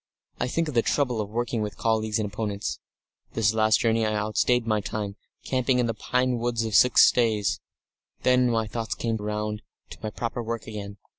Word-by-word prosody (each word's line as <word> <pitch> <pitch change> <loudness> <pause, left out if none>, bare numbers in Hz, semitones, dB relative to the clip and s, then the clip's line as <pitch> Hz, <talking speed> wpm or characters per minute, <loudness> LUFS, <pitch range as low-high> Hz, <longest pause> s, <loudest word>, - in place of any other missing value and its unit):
I 125 - 0
think 165 +6 0
of 150 - -4
the 115 - +4
trouble 125 -3 0
of 100 - -5
working 115 +1 -2
with 105 -1 -4
colleagues 110 -1 +1
and 110 - -1
opponents. 105 -1 -3 0.5
This 110 -1 +2
last 110 -1 +3
journey 115 -1 +2
I 110 -1 0
outstayed 110 +3 +1
my 110 -2 +1
time, 100 -1 -4 0.3
camping 130 0 +1
in 125 - +2
the 115 - -1
pine 125 +2 0
woods 120 -1 -1
for 110 - -3
six 125 +4 +7
days. 110 -4 +1 0.6
Then 125 -1 +4
my 115 -1 +1
thoughts 115 0 -3
came 115 -1 -1
round 105 0 -3 0.3
to - - -9
my 110 - -3
proper 115 +2 -4
work 115 -1 -4
again. 100 -2 -7
110 Hz, 195 wpm, -26 LUFS, 105-120 Hz, 0.6 s, six